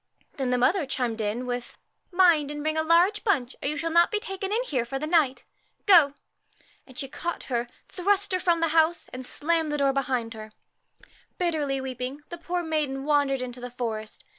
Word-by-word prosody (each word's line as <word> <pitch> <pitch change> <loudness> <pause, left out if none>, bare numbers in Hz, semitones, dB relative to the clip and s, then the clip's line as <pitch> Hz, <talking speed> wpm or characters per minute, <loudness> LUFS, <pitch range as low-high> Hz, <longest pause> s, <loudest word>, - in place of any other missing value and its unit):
Then 265 -3 -1
the 250 - +2
mother 300 +5 +2
chimed 240 -4 -2
in 215 +4 -2
with, 245 -1 -5 0.2
' - - -51
Mind 345 -5 +4
and 295 0 -5
bring 310 0 0
a 315 - +2
large 345 +6 +3
bunch, 270 - 0
or - - -2
you 300 - -3
shall 330 +2 -2
not 340 +1 +5
be 425 - -1
taken 390 -2 -5
in 460 +4 +1
here 265 - -1
for 240 +3 -4
the 290 - -3
night. 295 -7 +2 0.4
Go!' 325 -8 +6 0.7
and 260 -2 -15
she 270 - -3
caught 340 +6 -4
her, 240 0 0 0.2
thrust 395 +1 0
her 370 - +2
from 345 -2 +2
the 330 - +2
house, 325 +2 +2
and 255 +1 -6
slammed 320 +4 0
the 295 - 0
door 275 -1 +2
behind 255 -4 -1
her. 215 -1 -10 0.8
Bitterly 305 -6 0
weeping, 260 +2 -5
the 345 - -7
poor 350 +1 -2
maiden 295 -4 -2
wandered 285 -3 +2
into 250 0 -7
the 245 - -5
forest. 225 -3 -5
290 Hz, 205 wpm, -26 LUFS, 255-340 Hz, 0.8 s, Go